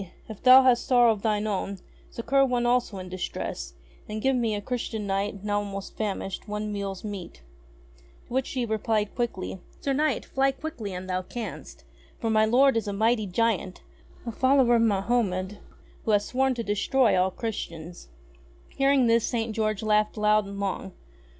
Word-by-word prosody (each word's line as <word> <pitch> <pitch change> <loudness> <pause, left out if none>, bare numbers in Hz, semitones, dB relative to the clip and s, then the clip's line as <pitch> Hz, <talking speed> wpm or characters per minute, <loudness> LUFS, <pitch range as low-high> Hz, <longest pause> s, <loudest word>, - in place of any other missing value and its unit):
If 215 -3 -9
thou 260 +1 +8
hast 250 -2 +3
sorrow 245 -2 +5
of 210 -3 -3
thine 210 -1 0
own, 200 -1 -2 0.3
succour 275 +4 +1
one 250 -2 +1
also 240 -4 +1
in 185 -1 -7
distress, 180 - -5 0.4
and 215 +1 -3
give 265 +4 +2
me, 230 -4 0
a - - -2
Christian 225 -2 -3
Knight, 200 0 -2
now 205 0 0
almost 200 -1 -6
famished, 195 -2 -4
one 210 0 -3
meal's 195 -2 -4
meat." 195 - -7 0.8
To - - -11
which 260 0 0
she 255 -3 -2
replied 215 -1 -1
quickly: 210 -6 -3 0.2
"Sir 275 - -1
Knight! 300 0 0
Fly 270 0 +1
quickly 270 -8 -6
an' 180 0 -6
thou 185 0 -2
canst, 225 +5 -8 0.3
for 225 -2 -1
my 215 0 +4
lord 255 +3 +4
is 220 - -2
a 200 - -2
mighty 220 +1 +1
giant, 195 -1 -1 0.4
a 235 - -3
follower 260 0 +4
of - - +2
Mahomed, 200 -2 0 0.5
who - - -2
hath 205 -1 +4
sworn 265 +2 0
to 235 - -3
destroy 225 +4 +2
all 185 +1 +3
Christians." 175 -5 -6 0.6
Hearing 275 -1 +3
this 230 -1 +3
St. 225 -2 -2
George 215 -1 -1
laughed 215 0 +2
loud 210 -1 +3
and 200 0 -7
long. 195 - -3
215 Hz, 175 wpm, -26 LUFS, 200-245 Hz, 0.8 s, thou